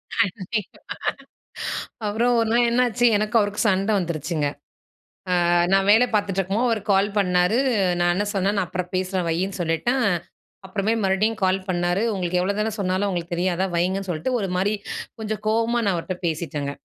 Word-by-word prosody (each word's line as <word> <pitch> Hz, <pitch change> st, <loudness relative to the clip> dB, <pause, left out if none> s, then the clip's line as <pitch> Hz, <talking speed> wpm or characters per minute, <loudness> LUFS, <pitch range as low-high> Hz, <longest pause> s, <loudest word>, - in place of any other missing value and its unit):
கண்டிப்பா. 210 Hz, -1 st, -2 dB, 1.3 s
அப்புறம் 230 Hz, +4 st, +1 dB
ஒரு 225 Hz, -, +1 dB
நாள் 240 Hz, +1 st, +4 dB
என்னாச்சு, 245 Hz, 0 st, +2 dB
எனக்கும் 215 Hz, +2 st, +2 dB
அவருக்கும் 205 Hz, +2 st, -1 dB
சண்ட 195 Hz, +1 st, +1 dB
வந்துருச்சுங்க. 160 Hz, -3 st, -2 dB, 1.0 s
அ -, -, +3 dB, 0.2 s
நான் 195 Hz, 0 st, +3 dB
வேல 225 Hz, +4 st, +6 dB
பார்த்துட்டு 200 Hz, -2 st, 0 dB
இருக்கும்போது 205 Hz, +7 st, 0 dB
அவர் 225 Hz, -3 st, 0 dB
கால் 195 Hz, +1 st, +3 dB
பண்ணாரு, 180 Hz, +2 st, +2 dB, 0.4 s
நான் 175 Hz, 0 st, +3 dB
என்ன 205 Hz, -, 0 dB
சொன்னேன், 195 Hz, +2 st, +1 dB
நான் 185 Hz, -3 st, 0 dB
அப்புறம் 180 Hz, 0 st, -4 dB
பேசுறேன் 185 Hz, -1 st, -1 dB
வைன்னு 185 Hz, +3 st, -2 dB
சொல்லிட்டேன். 215 Hz, +10 st, 0 dB, 0.6 s
அப்புறமேல் 215 Hz, +3 st, 0 dB
மறுபடியும் 210 Hz, +4 st, +1 dB
கால் 185 Hz, +1 st, +2 dB
பண்ணாரு, 175 Hz, +1 st, 0 dB
உங்களுக்கு 180 Hz, -2 st, -1 dB
எவ்வளோதான் 210 Hz, +3 st, -1 dB
சொன்னாலும் 190 Hz, +1 st, 0 dB
உங்களுக்கு 175 Hz, -2 st, -3 dB
தெரியாதா? 180 Hz, +1 st, 0 dB
வைங்கன்னு 190 Hz, +3 st, 0 dB
சொல்லிட்டு 175 Hz, +10 st, -2 dB
ஒரு 195 Hz, -, -2 dB
மாரி 195 Hz, +3 st, +1 dB, 0.5 s
கொஞ்சம் 215 Hz, -1 st, -4 dB
கோவமா 230 Hz, +2 st, +2 dB
நான் 200 Hz, -2 st, +2 dB
அவர்ட்ட 175 Hz, +2 st, -3 dB
பேசிட்டேங்க. 150 Hz, -3 st, -3 dB
195 Hz, 155 wpm, -23 LUFS, 180-215 Hz, 1.3 s, வேல